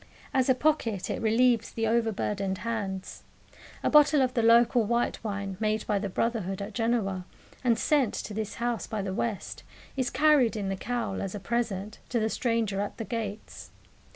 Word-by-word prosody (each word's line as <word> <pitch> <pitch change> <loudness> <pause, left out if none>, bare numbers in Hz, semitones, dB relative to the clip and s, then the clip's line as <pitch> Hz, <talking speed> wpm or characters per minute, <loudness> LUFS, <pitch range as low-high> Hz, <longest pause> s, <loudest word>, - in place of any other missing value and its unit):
As 260 -1 +2
a 260 - +5
pocket 250 -9 0
it - - -3
relieves 230 +1 +3
the 225 - -2
over 225 0 +2
burdened 195 -2 -2
hands. 200 -5 -4 0.6
A - - +2
bottle 300 -2 +6
of 255 -1 0
the 240 - +1
local 235 +1 +5
white 235 +2 0
wine 200 -3 -4
made 215 0 0
by 205 -1 +1
the 200 0 -3
brotherhood 195 -2 -1
at 200 +2 -6
Genoa, 220 -5 0 0.4
and 235 -3 +3
sent 275 -3 +2
to 210 - -5
this 215 0 -4
house 240 -1 -2
by 215 -3 -3
the 190 -1 -3
West, 210 0 -3 0.3
is 260 -2 0
carried 280 -4 +4
in 200 -3 -2
the 195 - -1
cowl 225 -1 -3
as 195 +1 -4
a - - -4
present 215 -2 -2
to 240 - +1
the 220 0 +1
stranger 225 -5 0
at 205 - -4
the 225 - -4
gates. 220 -3 -5
225 Hz, 185 wpm, -28 LUFS, 200-240 Hz, 0.6 s, bottle